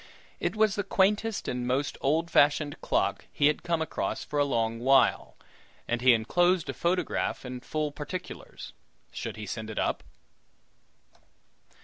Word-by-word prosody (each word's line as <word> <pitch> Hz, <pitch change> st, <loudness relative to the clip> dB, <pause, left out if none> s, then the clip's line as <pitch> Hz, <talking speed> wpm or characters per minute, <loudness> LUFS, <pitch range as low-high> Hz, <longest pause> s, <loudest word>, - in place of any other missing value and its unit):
It -, -, -1 dB
was 215 Hz, -2 st, +3 dB
the 205 Hz, -, -1 dB
quaintest 210 Hz, +3 st, +1 dB
and 125 Hz, 0 st, -2 dB
most 135 Hz, +3 st, 0 dB
old 160 Hz, +5 st, +1 dB
fashioned 145 Hz, 0 st, +3 dB
clock -, -, 0 dB
he 145 Hz, -, +1 dB
had 150 Hz, +1 st, +3 dB
come 170 Hz, -2 st, 0 dB
across -, -, -3 dB
for 150 Hz, -, -3 dB
a 145 Hz, -, +4 dB
long 115 Hz, -4 st, -1 dB
while, 135 Hz, +3 st, +3 dB, 0.5 s
and 120 Hz, 0 st, -1 dB
he 130 Hz, 0 st, +7 dB
enclosed 175 Hz, +10 st, +1 dB
photograph 175 Hz, -5 st, -1 dB
and 125 Hz, 0 st, -7 dB
full 150 Hz, +3 st, -2 dB
particulars; 180 Hz, +6 st, -7 dB, 0.4 s
should -, -, -6 dB
he 105 Hz, -, -6 dB
send 110 Hz, +2 st, -5 dB
it 110 Hz, -, -7 dB
up? -, -, 0 dB
145 Hz, 145 wpm, -28 LUFS, 125-175 Hz, 0.5 s, he